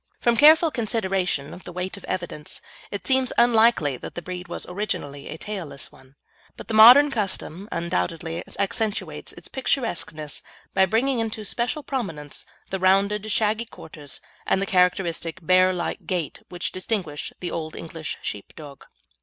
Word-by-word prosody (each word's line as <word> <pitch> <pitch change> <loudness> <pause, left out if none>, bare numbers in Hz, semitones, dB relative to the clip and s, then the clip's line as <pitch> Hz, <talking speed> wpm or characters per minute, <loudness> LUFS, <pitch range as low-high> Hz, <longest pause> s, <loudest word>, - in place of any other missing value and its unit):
From 235 -2 +3
careful 310 +5 +7
consideration 195 - -1
of 180 - -11
the - - -8
weight 180 +1 -4
of 200 - -11
evidence, 175 -4 -4 0.3
it 200 -2 -5
seems 260 -1 +3
unlikely 225 - +4
that - - -9
the 175 - -4
breed 180 0 -6
was 175 - -5
originally 145 -8 -4
a - - -6
tailless 165 -9 -5
one, 130 +1 -19 0.4
but - - -9
the 225 - -4
modern 250 +7 +9
custom 200 -3 -2
undoubtedly 165 - -2
accentuates 210 +1 -1
its - - -11
picturesqueness 170 - -2 0.3
by 190 0 +4
bringing 240 +5 +1
into 225 -1 -2
special 245 +8 -1
prominence 165 - -4 0.2
the 190 - -1
rounded 200 +3 +2
shaggy 220 +2 +2
quarters 150 - -9 0.3
and - - +3
the 195 - 0
characteristic 180 -3 +1
bear 185 +1 +5
like 175 -2 -4
gait 175 -6 -2
which 175 -1 -3
distinguish 185 -6 -3
the 180 - -4
Old 160 -1 -4
English 160 -2 -5
Sheepdog. 140 +7 -7
185 Hz, 150 wpm, -24 LUFS, 165-220 Hz, 0.4 s, modern